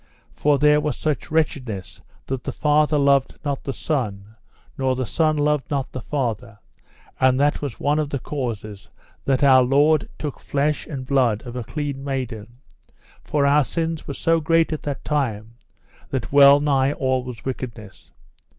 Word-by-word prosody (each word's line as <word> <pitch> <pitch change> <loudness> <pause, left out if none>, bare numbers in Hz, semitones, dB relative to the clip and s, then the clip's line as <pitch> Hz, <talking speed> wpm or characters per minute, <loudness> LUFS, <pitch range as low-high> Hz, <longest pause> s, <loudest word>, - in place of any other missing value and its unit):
For 145 -1 +2
there 150 +1 +4
was 150 -3 -2
such 155 -2 -2
wretchedness 125 - -2 0.2
that 130 -1 -4
the - - -3
father 150 0 +2
loved 140 -1 +3
not 140 -2 -2
the 135 - -3
son, 110 -9 -3 0.4
nor 130 -1 0
the 130 0 -2
son 155 +5 +1
loved 150 -2 0
not 140 -3 -2
the 130 - -6
father; 120 -6 -3 0.6
and 130 0 +3
that 145 +1 +2
was 140 -5 -5
one 145 +1 +1
of 150 -2 -1
the 140 - -2
causes 115 -7 -5 0.4
that 135 0 +1
Our 130 -2 +7
Lord 145 +4 +3
took 150 -3 -5
flesh 145 +1 -1
and 135 -4 -6
blood 125 -5 +1
of 120 0 -8
a 125 - -3
clean 140 +2 -4
maiden, 125 -6 -4 0.8
for 145 -2 0
our 145 +1 +4
sins 165 +2 -3
were 140 - -5
so 165 0 +2
great 165 0 +2
at 155 - -4
that 145 -2 -5
time 115 -7 -2 0.6
that 125 -4 -3
well 140 0 +8
nigh 140 -1 +2
all 130 -2 0
was 125 -3 -9
wickedness. 115 -6 -7
140 Hz, 170 wpm, -22 LUFS, 125-150 Hz, 0.8 s, well